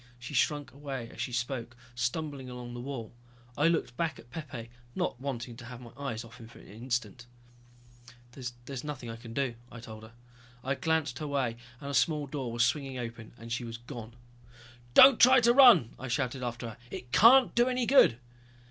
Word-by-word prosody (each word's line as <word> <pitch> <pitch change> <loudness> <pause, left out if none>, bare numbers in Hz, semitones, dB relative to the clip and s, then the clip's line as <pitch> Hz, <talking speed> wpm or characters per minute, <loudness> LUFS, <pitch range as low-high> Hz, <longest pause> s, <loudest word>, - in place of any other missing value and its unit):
She 120 +4 -9
shrunk 145 +1 +1
away 135 -3 -6
as - - -7
she - - -3
spoke, 120 0 -3 0.2
stumbling 130 +2 -3
along 125 -1 -8
the 120 - -6
wall. 125 -4 -6 0.4
I 150 - +3
looked 165 -7 0
back 165 -2 -1
at 120 - -16
Pepe, 135 -8 -7 0.2
not 120 - -2
wanting 120 -3 -4
to 120 - -10
have 120 0 -9
my 120 -2 -12
eyes 130 -5 -4
off 115 0 -14
him 115 -2 -12
for 115 - -16
an - - -15
instant. 120 +1 -4 1.0
"There's 125 +1 -7
nothing 130 -6 -6
I - - -7
can 115 0 -11
do," 135 -4 0 0.2
I 120 - -9
told 110 -2 -10
her. 110 +1 -14 0.5
I 135 - 0
glanced 160 -4 -1
her 150 - -4
way 135 -5 -1 0.2
and 140 -1 -6
a - - -6
small 150 +1 +2
door 135 -3 -4
was 120 +1 +3
swinging 135 0 -2
open 115 -2 -7
and 115 0 -10
she 120 - -2
was 115 -1 -6
gone. 120 -1 -9 0.8
"Don't 265 -2 +9
try 255 +1 +8
to 235 0 +5
run," 240 - +7
I 130 - -6
shouted 130 +1 -2
after 120 -1 -4
her, 110 - -11
"it 125 0 -8
can't 245 - +7
do 240 +1 +3
any 250 -1 0
good!" 260 - +6
125 Hz, 200 wpm, -30 LUFS, 120-145 Hz, 1.0 s, Don't